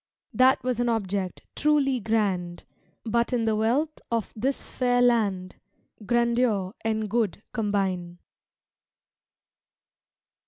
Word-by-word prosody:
That 260 0 +4
was 250 -2 -1
an 240 0 +1
object 200 -4 -2
truly 280 -3 +2
grand, 195 -6 -1 0.4
But 235 +2 +1
in 235 -2 +1
the 220 -1 +2
wealth 255 +9 0
of 230 -2 -2
this 260 +5 -1
fair 245 -1 0
land 205 -7 +1 0.5
Grandeur 235 -4 +1
and 220 -1 -1
good 210 -2 -1
combine. 195 -6 -1
225 Hz, 105 wpm, -26 LUFS, 200-245 Hz, 0.5 s, That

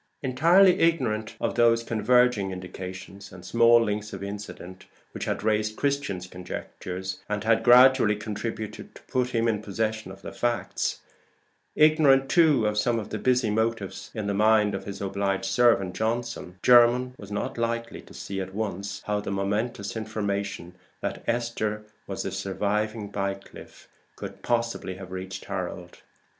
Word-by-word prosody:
Entirely 175 +8 +5
ignorant 120 -10 +1
of - - -1
those 115 -1 +4
converging 115 -2 +2
indications 95 +2 -8
and 90 -1 -12
small 115 0 +5
links 105 0 -3
of 95 0 -6
incident 100 -2 -8 0.2
which - - -5
had - - -2
raised 110 0 +1
Christian's 140 -11 -1
conjectures, 90 +1 -6
and 105 0 -2
had 115 0 +3
gradually 125 -2 +6
contributed 110 +1 -6
to - - -13
put 125 -1 0
him 115 -1 +1
in 110 -2 0
possession 110 0 -3
of 95 +1 -13
the - - -6
facts; 120 +4 -2 0.7
ignorant 150 -3 +5
too 155 -9 +4
of 105 0 +1
some 120 +2 +1
busy 115 +2 +1
motives 110 -2 -2
in 110 -2 -3
the 100 - -1
mind 105 0 +4
of 95 0 -4
his 100 -1 -7
obliged 100 0 -1
servant 95 -2 +3
Johnson; 115 -4 -3
Jermyn 125 +1 +5
was 100 0 -10
not 105 +3 -3
likely 115 0 -2
to - - -16
see 95 -1 -5
at 95 0 -7
once 100 -2 -4
how 105 0 0
the 105 - -5
momentous 100 +2 -2
information 100 -4 -3 0.3
that - - -4
Esther 115 -3 -1 0.2
was 95 - -4
the 95 - -3
surviving 105 +3 -2
Bycliffe 100 -1 -6 0.3
could - - -8
possibly 115 -5 -1
have 95 -1 -10
reached 95 +1 -6
Harold. 90 -2 -5
105 Hz, 150 wpm, -26 LUFS, 100-115 Hz, 0.7 s, gradually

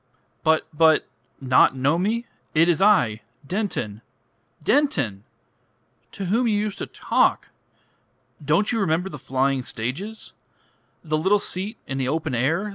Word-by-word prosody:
"But 160 0 +3
but... 160 0 +4 0.3
Not 130 0 +4
know 140 +6 +1
me! 225 +5 -1 0.3
It 165 +2 +5
is 175 +1 +2
I 125 - +4 0.2
Denton. 155 - -3 0.6
Denton! 135 - +1 0.9
To 195 - -5
whom 230 +7 +1
you 210 -2 +2
used 210 -1 -3
to - - -4
talk. - - +1 0.9
Don't 160 +8 +2
you 230 - 0
remember 180 -1 0
the - - -8
flying 135 0 0
stages? 140 - -6 0.7
The 155 -2 -1
little 190 +6 +3
seat 200 +2 -4
in 135 0 -4
the 130 - -1
open 155 0 -2
air? 160 - 0
160 Hz, 135 wpm, -23 LUFS, 135-205 Hz, 0.9 s, It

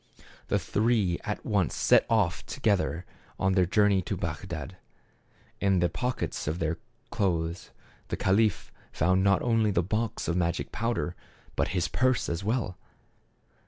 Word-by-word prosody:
The - - +2
three 105 -5 +1
at 105 - -4
once 100 -7 +1
set - - +4
off 100 -9 +2
together 95 -4 0 0.3
on 95 0 +2
their 90 -2 +3
journey 100 0 +3
to 90 - -3
Bagdad. - - -5 0.8
In 100 -1 +3
the 85 0 +2
pockets 125 +2 -3
of 80 +3 -1
his 80 0 -1 0.3
clothes 85 -3 -1 0.4
the - - -3
caliph 100 0 +2 0.2
found 95 +3 +2
not 100 -1 +3
only 115 -3 +3
the 90 -3 +2
box 110 +4 -2
of 85 - 0
magic 85 -2 -1
pow 115 +1 -1
der, 90 - -2 0.4
but - - +1
his 85 -2 +1
purse 130 +7 +1
as 85 +3 -2
well. 110 -4 -1
95 Hz, 150 wpm, -28 LUFS, 85-110 Hz, 0.8 s, set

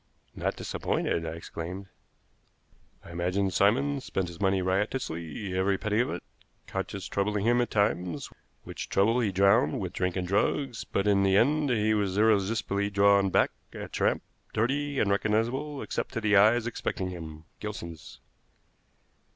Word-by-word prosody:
"Not - - -2
disappointed!" 85 0 -2
I 80 - -4
exclaimed. 85 +3 -6 1.2
"I - - -10
imagine 90 +3 0
Simon 135 +10 +2
spent 95 -7 -2
his 85 +1 -11
money 95 -1 +2
riotously, 95 - -2
every 95 +1 +2
penny 110 +1 0
of 125 - +2
it, - - -5 0.4
conscience 95 0 -4
troubling 105 +1 -1
him 120 +1 +4
at 120 - -1
times, 90 -5 0 0.4
which - - -7
trouble 115 +5 +3
he 110 -5 +1
drowned 100 +6 +3
with 90 -2 -4
drink 90 -1 -1
and 90 -1 -2
drugs; 115 +6 0
but 100 - -1
in 100 -1 +4
the 95 0 +4
end 145 +5 +3
he 110 -3 +2
was 100 -3 0
irresistibly 105 -1 +2
drawn 100 -1 +4
back, - - +3 0.2
a - - -6
tramp, - - 0 0.3
dirty, 140 +5 0
unrecognizable, 115 +8 0
except - - -4
to 115 - -2
the 105 -1 +3
eyes 110 +4 +5
expecting 95 -5 -3
him 80 -3 -8 0.2
Gilson's." 85 -6 -7
100 Hz, 150 wpm, -28 LUFS, 95-115 Hz, 1.2 s, eyes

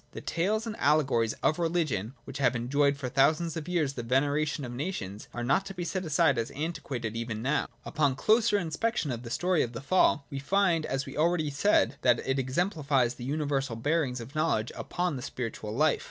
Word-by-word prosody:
The - - -6
tales 210 +6 -1
and 220 -2 -4
allegories 135 -7 +2
of 155 - +2
religion, 155 - -1
which 135 +2 -8
have 125 -2 +3
enjoyed 140 +4 +1
for 135 -2 -4
thousands 155 +6 +2
of 160 0 -5
years 160 -6 +1
the 125 - -4
veneration 145 +4 0
of 120 - -6
nations, 120 - -5
are 120 - -4
not 140 +10 +2
to 195 - -7
be 180 - -3
set 185 +1 -3
aside 155 -4 +3
as 115 - -2
antiquated 135 -7 -4
even 115 -1 -4
now. 140 +3 +1 0.2
Upon 145 -3 +1
a - - -9
closer 215 - +3
inspection 170 - -1
of 120 -1 -4
the 120 - -8
story 175 +6 +1
of 120 - -2
the 115 - -5
Fall 155 -6 +4
we 140 - -3
find, 170 +1 +2
as 135 +1 -2
was 135 - -8
already 155 -1 +2
said, 200 +9 +2
that 120 -2 +4
it 135 0 +1
exemplifies 135 - +1
the 125 - -8
universal 140 -3 -1
bearings, 135 +1 0
of 120 +4 -9
knowledge 155 -8 0
upon 175 -5 -2
the - - -6
spiritual 115 -4 -5
hfe. 155 +1 +3
140 Hz, 205 wpm, -29 LUFS, 125-165 Hz, 0.2 s, Fall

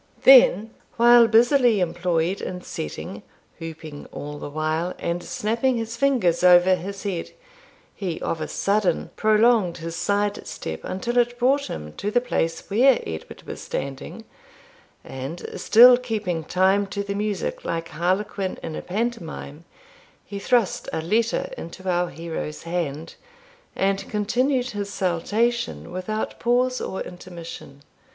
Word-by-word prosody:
Then, 225 -5 +7 0.3
while 240 0 +7
busily 240 0 +4
employed 175 +1 0
in 180 -1 -5
setting, 75 - -6 0.4
whooping 160 -2 -8
all 145 0 -7
the - - -6
while, 155 +4 -2
and 170 +1 -2
snapping 235 +7 -1
his 230 0 -4
fingers 235 -11 +2
over 180 +1 +7
his 190 +2 -4
head, 190 -5 -3 0.6
he 180 -5 -4
of 160 - -2
a 155 - -2
sudden 200 -4 0
prolonged 215 -4 +3
his 165 0 -6
side 205 +3 -1
step 80 0 -5
until 235 +6 -1
it 240 0 +1
brought 270 +3 +2
him 75 0 -7
to 205 - -2
the 245 - +3
place 165 -9 -2
where 245 +5 +4
Edward 80 -1 -7
was - - -8
standing, 135 -1 -6 0.8
and, 135 +6 -7
still 245 +3 +8
keeping 210 -10 -3
time 190 +3 +2
to 200 +1 -3
the 200 0 -4
music 205 -1 -3
like 165 0 -3
Harlequin 190 +3 -1
in 155 - -5
a - - -4
pantomime, 180 -7 -4 0.6
he 200 - -6
thrust 235 -1 +1
a - - -2
letter 220 +6 0
into 185 +3 -9
our 175 -1 +1
hero's 160 -1 -6
hand, 165 -2 -3 0.6
and 195 0 0
continued 245 +5 0
his 205 -1 -4
saltation 210 +7 -1
without 185 +4 -4
pause 250 +1 +1
or 190 - -4
intermission. 170 -5 -9
195 Hz, 135 wpm, -23 LUFS, 165-230 Hz, 0.8 s, still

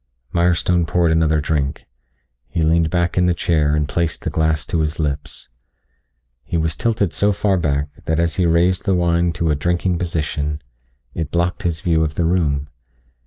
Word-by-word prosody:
Mirestone 85 0 +2
poured 85 0 +2
another 80 -1 +2
drink. 75 -1 -2 0.6
He 80 - -1
leaned 80 +1 +3
back 85 +1 0
in 90 - +3
the 90 - +2
chair 75 -4 +1
and 75 -1 0
placed 85 0 -2
the - - -2
glass 80 -1 0
to 85 - -1
his 75 +1 -1
lips. 70 -2 -3 1.0
He 85 - -2
was 80 -1 -1
tilted 110 -6 0
so 105 +1 +2
far 100 0 +1
back 75 -4 0 0.2
that 80 0 0
as 85 -1 0
he 90 -2 +2
raised 85 +2 +2
the 95 -2 +2
wine 85 -1 +2
to 80 0 0
a - - +2
drinking 85 +4 0
position, 75 -3 -2 0.5
it 80 -3 -3
blocked 85 +2 -1
his 85 0 -2
view 80 -5 +2
of 75 -1 -2
the 85 - 0
room. 75 -5 0
85 Hz, 180 wpm, -20 LUFS, 75-85 Hz, 1.0 s, leaned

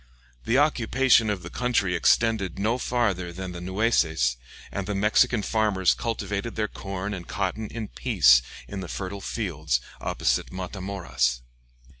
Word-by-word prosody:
The 120 - +2
occupation 130 -4 +3
of 100 -3 -2
the - - -8
country 120 -7 +1
extended 110 -6 +2
no 110 +5 0
farther 100 -9 0
than 90 +1 -6
the 90 -1 -7
Nueces, 90 - +1 0.4
and 100 -1 -4
the 105 - -2
Mexican 105 +3 +3
farmers 105 -5 +2
cultivated 105 -1 -3
their 110 -1 0
corn 100 0 -5
and 90 -3 -7
cotton 105 +2 -2
in 110 -1 -6
peace 75 - +4 0.3
in 100 - -6
the 95 - -6
fertile 100 +2 -5
fields 80 - -1 0.2
opposite - - 0
Matamoras. 90 -10 -2
100 Hz, 140 wpm, -26 LUFS, 90-115 Hz, 0.4 s, peace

